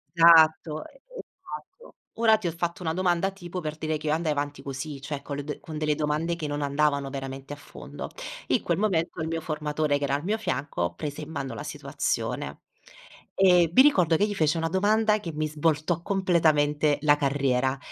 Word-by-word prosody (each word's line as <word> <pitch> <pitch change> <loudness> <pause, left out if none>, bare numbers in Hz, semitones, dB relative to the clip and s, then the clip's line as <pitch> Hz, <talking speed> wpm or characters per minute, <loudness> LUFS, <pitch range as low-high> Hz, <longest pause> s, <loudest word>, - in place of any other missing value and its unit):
Esatto. 160 -2 +6
Esatto. - - -12 0.2
Ora 220 -1 +5
ti 200 - -4
ho - - 0
fatto 170 +2 -3
una 160 -2 -1
domanda 180 +1 +1
tipo, 180 -2 -7
per 155 -2 -5
dire 155 0 -2
che 155 - -7
io 150 - +2
andai 160 -1 0
avanti 145 -1 -3
così, 140 +1 -6
cioè 140 0 -5
con 140 0 -6
le 145 - -4
d 150 - -6
con 155 -1 -8
delle 150 -1 +1
domande 155 +3 -1
che 160 -3 -4
non 145 0 -3
andavano 140 -1 +1
veramente 135 +1 -6
a - - -6
fondo. 145 - -9 0.4
In - - +2
quel 170 -1 0
momento 175 -5 0
il 160 - -2
mio 165 0 -2
formatore 150 -1 -1
che - - -4
era 140 0 0
al 145 - -3
mio 210 +5 0
fianco, 125 - -2
prese 145 - -5
in 150 - -8
mano 135 -4 -4
la - - -6
situazione. - - -3 0.7
E 180 -3 +5
mi 260 - +8
ricordo 180 - +4
che 205 - +3
gli 205 - -3
fece 155 -2 +2
una 165 0 -1
domanda 210 +4 +2
che 170 -5 -6
mi 155 +1 -1
svoltò 155 +2 0
completamente 155 -6 +2
la 145 -1 +5
carriera, 135 -2 +1
155 Hz, 200 wpm, -26 LUFS, 145-175 Hz, 0.7 s, mi